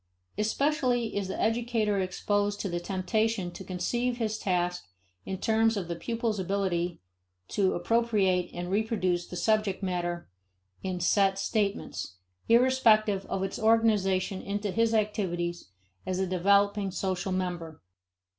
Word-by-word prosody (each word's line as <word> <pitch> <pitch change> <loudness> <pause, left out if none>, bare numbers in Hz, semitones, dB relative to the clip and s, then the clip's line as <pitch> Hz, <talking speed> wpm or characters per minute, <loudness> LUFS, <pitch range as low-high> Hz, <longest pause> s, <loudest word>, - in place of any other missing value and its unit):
Especially 245 +1 0
is 200 -2 -1
the 190 - -4
educator 225 -3 +1
exposed 205 +2 0
to - - -2
the 175 -2 -2
temptation 195 +1 -1
to 190 - -9
conceive 240 +7 -1
his 220 -2 -2
task 175 -2 -1 0.4
in 190 - -3
terms 225 +2 +2
of 185 -4 -3
the 170 - -3
pupil's 230 +2 -2
ability 180 -2 -1 0.5
to 195 -2 +1
appropriate 195 -2 +1
and 175 +1 -5
reproduce 195 -5 0
the - - -8
subject 210 0 +1
matter 175 -2 -2 0.5
in 185 -2 -3
set 195 +2 +3
statements, 200 - -2 0.3
irrespective 225 -5 +4
of 190 - -2
its 195 - -3
organization 210 -4 +2
into 205 0 -3
his 230 +3 +2
activities 175 - -1 0.4
as 185 - -2
a 190 - +1
developing 200 +2 +2
social 190 0 -2
member. 175 -4 -3
195 Hz, 130 wpm, -28 LUFS, 185-220 Hz, 0.5 s, irrespective